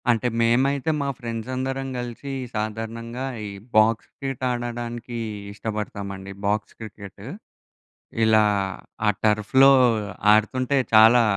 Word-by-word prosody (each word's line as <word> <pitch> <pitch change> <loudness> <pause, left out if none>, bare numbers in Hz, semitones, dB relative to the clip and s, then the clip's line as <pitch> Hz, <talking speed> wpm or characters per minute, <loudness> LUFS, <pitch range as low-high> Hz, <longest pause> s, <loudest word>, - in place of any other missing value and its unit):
అంటే, 120 +1 +2
మేమైతే, 130 +5 +2
మా 140 - -1
ఫ్రెండ్సందరం 130 +3 -4
గలిసి 120 +3 -6 0.2
సాధారణంగా, 115 +3 -4 0.2
ఈ - - -6 0.3
బాక్స్ 110 +1 +4
క్రికెట్ 135 -2 -5
ఆడడానికి 120 0 -4 0.4
ఇష్టబడతామండి. 100 -3 -5
Box 105 +1 -1
cricket. 105 -3 -10 1.0
ఇలా 110 -1 +5 0.6
ఆ - - +6 0.2
టర్ఫ్‌లో 110 +6 +5 0.6
ఆడుతుంటే, 130 +5 +1 0.2
చాలా 115 +2 +8
115 Hz, 95 wpm, -24 LUFS, 110-130 Hz, 1.0 s, చాలా